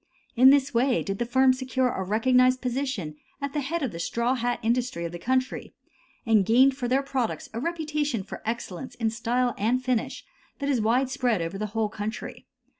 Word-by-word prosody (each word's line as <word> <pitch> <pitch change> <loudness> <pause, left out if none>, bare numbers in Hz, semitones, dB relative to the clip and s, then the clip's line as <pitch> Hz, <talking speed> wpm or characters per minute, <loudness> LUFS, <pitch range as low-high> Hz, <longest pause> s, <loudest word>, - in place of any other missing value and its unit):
In 255 +2 +8
this 275 -1 +3
way 245 +2 +2
did 195 0 -4
the 240 - -1
firm 260 +1 +4
secure 260 0 0
a - - -3
recognized 255 +5 +3
position 250 - -3 0.2
at 280 -1 -4
the 300 - 0
head 320 +4 -2
of 255 - -1
the 165 - -7
straw 235 +8 0
hat 245 -1 -1
industry 235 -6 0
of 170 - -4
the 175 - -7
country, 255 +6 -1 0.5
and 220 -3 +4
gained 255 +6 +4
for 255 -3 -3
their 265 +3 +2
products 265 -4 -3
a 230 - -3
reputation 300 - -2
for 190 - -9
excellence 235 +1 -5
in 225 -2 -1
style 240 +2 0
and 240 +5 +1
finish 250 -3 -2 0.3
that 280 0 -3
is 255 -5 +2
widespread 250 0 +1
over 165 +4 -4
the 215 - -2
whole 220 -1 +2
country. 210 +1 -6
245 Hz, 190 wpm, -26 LUFS, 220-260 Hz, 0.5 s, In